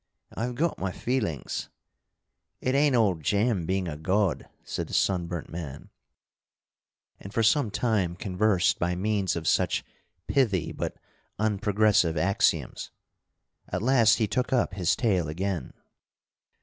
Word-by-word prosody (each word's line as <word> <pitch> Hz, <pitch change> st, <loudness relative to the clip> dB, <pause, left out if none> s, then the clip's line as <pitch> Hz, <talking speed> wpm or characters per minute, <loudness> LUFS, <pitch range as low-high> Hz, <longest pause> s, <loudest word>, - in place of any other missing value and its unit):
I've 120 Hz, +2 st, -3 dB
got 165 Hz, +5 st, 0 dB
my 95 Hz, 0 st, -2 dB
feelings 105 Hz, -, -2 dB, 0.9 s
"It 130 Hz, -, -1 dB
ain't 140 Hz, -1 st, +3 dB
all 110 Hz, -5 st, +4 dB
jam 100 Hz, +2 st, 0 dB
being 95 Hz, 0 st, 0 dB
a 75 Hz, -, -4 dB
god," 95 Hz, +3 st, 0 dB
said -, -, -4 dB
the -, -, -4 dB
sunburnt 90 Hz, -3 st, 0 dB
man, 75 Hz, -4 st, -7 dB, 1.3 s
and 95 Hz, -, -9 dB
for 115 Hz, -, +1 dB
some 120 Hz, +2 st, +3 dB
time 100 Hz, -5 st, 0 dB
conversed 95 Hz, 0 st, +1 dB
by 90 Hz, +1 st, 0 dB
means 100 Hz, -1 st, 0 dB
of 80 Hz, -2 st, -4 dB
such -, -, +2 dB, 0.4 s
pithy 95 Hz, -, +1 dB
but -, -, -4 dB, 0.4 s
unprogressive 105 Hz, -4 st, +2 dB
axioms. 95 Hz, +5 st, +1 dB, 0.8 s
At -, -, -2 dB
last 120 Hz, -3 st, +5 dB
he 110 Hz, -, +2 dB
took 125 Hz, +4 st, -1 dB
up 125 Hz, -6 st, +1 dB
his 90 Hz, -3 st, +1 dB
tale 95 Hz, -, +1 dB
again. 90 Hz, -2 st, -3 dB
100 Hz, 130 wpm, -27 LUFS, 90-115 Hz, 1.3 s, last